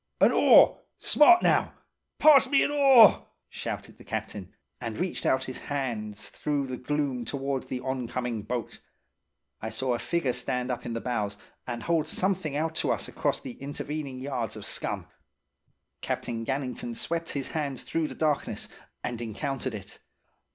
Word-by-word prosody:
"'An - - +6
oar! - - +6 0.2
Smart, 350 +4 +6
now–pass 300 -3 +3
me 280 - +4
an - - 0
oar!' 270 -7 +7 0.2
shouted - - -6
the - - -12
captain; - - -5 0.3
and 115 -3 -5
reached 180 +1 -2
out 130 - +2
his 130 - -6
hands 115 -7 -3
through 145 -2 -1
the 130 -1 -4
gloom 140 -2 -1
towards 135 +2 -3
the 125 - -3
on 130 -2 -3
coming 120 -3 -3
boat. 115 +1 -4 0.8
I 110 - -3
saw 125 +4 -1
a 120 - -1
figure 140 -1 0
stand 125 +1 -2
up 125 - -4
in 120 - -3
the 115 - -3
bows, 105 -5 -2 0.3
and 120 -2 -4
hold 165 -2 +1
something 185 -6 -1
out 160 +2 0
to - - +1
us - - -2
across - - -1
the 130 -1 -9
intervening 145 -1 -5
yards 125 -6 -3
of 105 - -8
scum. - - -3 1.0
Captain 115 -1 -3
Gannington 130 -3 -3
swept 165 +7 -3
his 140 -2 -3
hands 145 -5 -3
through 165 -1 -1
the - - -8
darkness, 150 -2 -1 0.3
and 120 -1 -3
encountered 130 +2 -3
it. 100 - -10
130 Hz, 160 wpm, -28 LUFS, 120-150 Hz, 1.0 s, oar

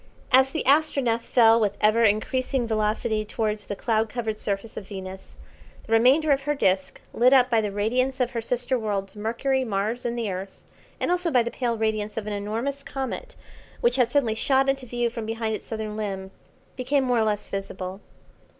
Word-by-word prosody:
As 265 +1 +6
the 315 - -3
Astronef 275 -5 +3
fell 230 -1 +5
with 205 -2 0
ever 215 +2 +4
increasing 245 +4 +1
velocity 215 0 0
towards 215 -1 -3
the 205 - -3
cloud 220 +1 0
covered 220 -2 -3
surface 200 +2 -3
of 195 - -7
Venus, 190 -1 -9 0.5
the 225 - -2
remainder 265 +7 +5
of 275 0 +3
her 295 +2 -1
disc, 190 -8 0
lit 250 +3 +5
up 255 -1 +5
by 225 -1 +4
the 210 -2 -2
radiance 250 +6 0
of 250 -1 +1
her 235 -3 -3
sister 245 +2 -1
worlds, 200 -3 -3
Mercury, 235 +5 0
Mars, 220 +1 -2
and 240 0 -2
the 225 -4 -2
Earth, 190 +1 -6 0.4
and - - 0
also 360 -1 +1
by 250 -6 +3
the 235 - -4
pale 240 -3 -1
radiance 215 -1 -1
of 220 - -3
an 210 - -3
enormous 225 +8 -3
comet, 275 - -5 0.4
which 240 +2 +2
had 245 -2 +2
suddenly 250 -6 +2
shot 265 +4 +2
into 270 -1 -1
view 240 0 -1
from 230 -2 -5
behind 225 0 -2
its - - -6
southern 220 -1 -4
limb, 195 -3 -4 0.4
became 265 +2 +1
more 250 -2 +2
or - - +3
less 210 -1 -1
visible. 195 -1 -5
230 Hz, 195 wpm, -25 LUFS, 210-255 Hz, 0.5 s, As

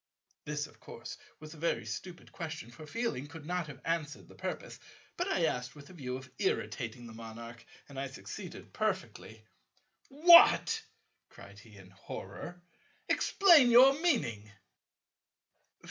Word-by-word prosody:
This 150 0 -2
of - - -17
course - - -9 0.2
was 155 0 -10
a - - -13
very 170 +2 -1
stupid 180 -2 -7
question, 160 -8 -6
for 150 +5 -12
feeling 225 - -3
could 150 +1 -11
not 180 -1 -2
have 140 -3 -10
answered 160 -2 -2
the - - -15
purpose; - - -6 0.4
but 355 - -2
I 175 - +1
asked 125 -4 -2
with 145 -1 -12
the 165 - -14
view 130 -6 -5
of 130 0 -12
irritating 120 +1 -2
the 115 - -10
Monarch, 115 +1 -9 0.2
and 140 -2 -8
I 140 - -2
succeeded 130 - -9
perfectly. 110 0 -3 0.6
"What!" 340 +8 +7 0.5
cried 100 0 -14
he 105 0 -16
in 95 -1 -15
horror, 175 - -9 0.5
"explain 335 -10 +6
your 255 +3 +8
meaning." 115 - 0
150 Hz, 145 wpm, -32 LUFS, 120-180 Hz, 0.6 s, your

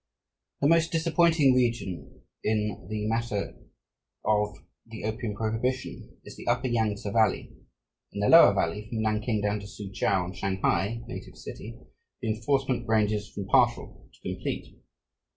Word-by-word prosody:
The 140 - +4
most 165 +1 +4
disappointing 165 -3 +4
region 120 -7 -1 0.2
in 105 -3 -1
the 105 0 -2
matter 115 -3 -2 0.7
of 105 -2 +1 0.3
the 110 -1 -9
opium 110 0 -3
prohibition 115 +4 -3
is - - -10
the - - -11
upper 120 +2 +1
Yangtse 110 -3 0
Valley. 110 -1 +2 0.6
In - - -6
the 105 - +2
lower 165 -12 +8
valley, 100 +4 -1
from 110 -2 -2
Nanking 110 0 0
down 105 +1 0
to 100 - -9
Soochow 100 -2 -1
and 90 +1 -7
Shanghai 95 +4 0
(native - - -8
city), 115 +2 -9 0.4
the 115 - -3
enforcement 120 +2 0
ranges 105 -1 +1
from 100 - -6
partial - - +1
to - - -24
complete. - - -5
110 Hz, 140 wpm, -27 LUFS, 105-120 Hz, 0.7 s, lower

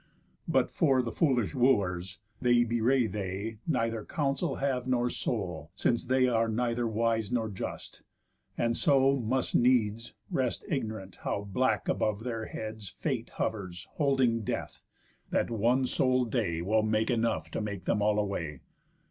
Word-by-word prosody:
But - - +2
for 135 -6 +3
the 115 - -3
foolish 125 - +1
Wooers, 95 -7 +1 0.2
they 120 -1 +4
bewray 120 +2 +2
They 100 +1 -4
neither 115 -7 0
counsel 140 - -1
have 130 -2 -1
nor 125 -1 +1
soul, 95 -9 -3
since 120 - +1
they 130 0 +3
Are 115 -2 +2
neither 120 +1 0
wise 115 -1 0
nor 115 -3 0
just, 95 - -6 0.6
and 115 0 +1
so 135 -2 +4
must 125 +2 -1
needs 115 -2 +2 0.2
Rest 130 -3 -1
ignorant 110 - -3
how 100 - -3
black 105 0 0
above 110 0 0
their 115 -3 -3
heads 110 -2 -6
Fate - - -2
hovers 90 -5 -3
holding 135 -5 +2
Death, 105 - -4 0.5
that - - 0
one 120 +4 +2
sole 130 0 +2
day 100 -9 -1
Will 110 +4 +3
make 110 +2 +1
enough 115 -1 0
to - - -2
make 100 -4 -5
them 105 - +1
all 105 0 +3
away. 85 -9 -2
115 Hz, 150 wpm, -30 LUFS, 105-125 Hz, 0.6 s, they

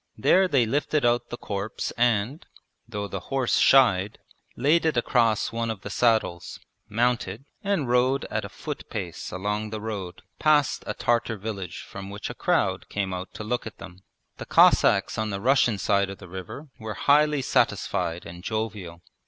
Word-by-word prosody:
There 190 0 +4
they 135 -8 +3
lifted 145 +3 0
out 120 0 +1
the 120 - -5
corpse 100 -1 -4
and 120 +4 0 0.5
(though 105 -3 -4
the 95 - -5
horse 135 -2 +1
shied) 105 -7 +4 0.4
laid 150 +6 +3
it 160 -5 +1
across 115 -3 +2
one 115 0 -2
of 110 -4 -4
the 105 - -7
saddles, 110 -7 0 0.3
mounted, 115 0 0 0.2
and 195 -9 0
rode 125 +2 +2
at - - -1
a - - -6
foot - - -7
pace - - -5
along 105 +3 -2
the 110 0 -5
road 100 -5 -6 0.2
past 150 -3 +3
a - - -3
Tartar 115 -2 0
village 100 -4 -6
from 95 0 -8
which 100 +1 -6
a - - -7
crowd - - 0
came 95 -2 -2
out 90 +1 -5
to - - -6
look 120 +2 -2
at 110 - -10
them. 90 0 -11 0.4
The - - -8
Cossacks - - +4
on 110 0 -1
the 100 -1 -3
Russian 120 -1 +3
side 100 0 +1
of 95 - -7
the 95 - -12
river 95 - -8
were 110 -1 -5
highly 150 -1 +3
satisfied 85 -7 0
and 85 +1 -10
jovial. 105 -6 -4
110 Hz, 175 wpm, -25 LUFS, 100-125 Hz, 0.5 s, There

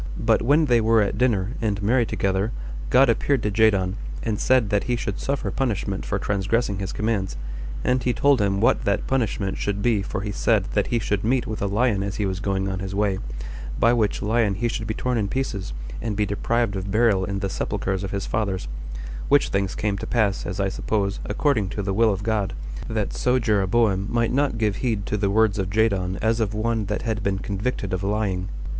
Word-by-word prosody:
But 110 -1 +2
when 145 +6 +4
they 120 -4 +4
were 110 0 +4
at 100 - -2
dinner, 110 -5 +2
and 105 -3 0
merry 115 +2 +3
together, 95 +3 0 0.4
God 135 +2 +6
appeared 125 +2 +1
to 105 - 0
Jadon, 100 -3 +3 0.3
and 110 -2 -1
said 125 -5 +3
that 105 -1 +1
he 125 - +1
should 120 - -3
suffer 140 0 -2
punishment 105 - -2
for - - 0
transgressing 100 +1 0
his 95 -1 -3
commands, 100 - -1 0.5
and 125 0 +2
he 125 - +1
told 135 +1 +3
him 100 -1 +1
what 115 - +3
that 100 -1 +1
punishment 110 -7 -1
should 100 0 -2
be 115 -4 +3
for 100 +1 -3
he 105 0 -3
said 110 -1 +2
that 105 - +1
he 120 - +1
should 105 -3 -1
meet 125 +2 +1
with 110 - -5
a 100 - +1
lion 105 0 +1
as 100 -1 -3
he 105 - -1
was 95 -1 -2
going 95 -1 -1
on 95 -1 -2
his 95 0 -4
way, 100 -2 +1 0.6
by 115 +1 +5
which 110 -3 +1
lion 110 -1 +2
he 120 +4 0
should 110 -2 -3
be 110 - -2
torn 125 -2 0
in 100 - 0
pieces, 100 - -3 0.3
and 110 -3 -3
be 105 - +2
deprived 110 +1 0
of 95 0 -4
burial 105 -2 +3
in 100 +1 -2
the 100 0 -1
sepulchers 95 +1 -2
of 95 - -3
his 100 0 -3
fathers; 95 - -2 0.6
which - - +4
things 100 -1 -1
came 100 -2 -1
to - - -5
pass, 105 -5 +1
as 95 - -4
I 95 0 +1
suppose, 100 0 -1
according 110 -3 +1
to 100 - -1
the 95 0 -1
will 110 +2 +4
of 100 0 -3
God, 105 -3 0 0.4
that - - -1
so 125 0 +2
Jeroboam 105 -2 +2
might 115 0 +1
not 140 -3 +1
give 105 -3 0
heed 110 -6 -1
to - - -1
the 100 -1 0
words 105 0 +3
of 95 -2 -1
Jadon 95 -3 +1
as 115 +1 +2
of 105 -1 -1
one 110 0 0
that 105 +2 -3
had 110 -2 -1
been 100 -1 0
convicted 100 0 -3
of 90 - -1
lying. 100 -2 -1
105 Hz, 220 wpm, -24 LUFS, 100-115 Hz, 0.6 s, God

